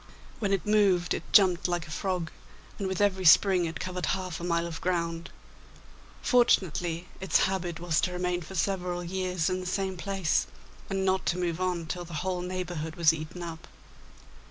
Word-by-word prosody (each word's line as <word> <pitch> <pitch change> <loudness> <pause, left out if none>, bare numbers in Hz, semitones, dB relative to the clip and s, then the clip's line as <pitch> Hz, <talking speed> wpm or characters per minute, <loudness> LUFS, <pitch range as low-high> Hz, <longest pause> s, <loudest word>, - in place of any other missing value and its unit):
When 205 -3 -1
it 195 -2 0
moved 200 -4 +3
it - - -6
jumped 185 -3 +5
like 175 -3 -1
a - - -10
frog, 180 0 -2 0.5
and 195 - -1
with 190 -1 -2
every 190 -2 +2
spring 180 +2 +6
it 165 0 -5
covered 180 -1 -3
half 185 -3 -5
a - - -7
mile 170 -1 0
of 165 -1 -6
ground. 170 -2 -1 0.9
Fortunately 180 - +2
its 190 - +2
habit, 180 -3 -1
was 165 -3 +1
to 180 - 0
remain 180 0 -1
for 185 +4 -9
several 180 -1 -1
years 180 -1 -1
in 185 0 0
the 185 - -6
same 190 0 -2
place, 190 -3 0 0.4
and 195 0 -1
not 190 0 +1
to 175 - +1
move 175 -1 -2
on 180 -2 -1
till 175 +2 -4
the 170 -2 -8
whole 185 -1 -1
neighbourhood 175 -3 -4
was 170 -2 +5
eaten 160 +3 -6
up. 165 -1 -7
180 Hz, 180 wpm, -28 LUFS, 170-190 Hz, 0.9 s, spring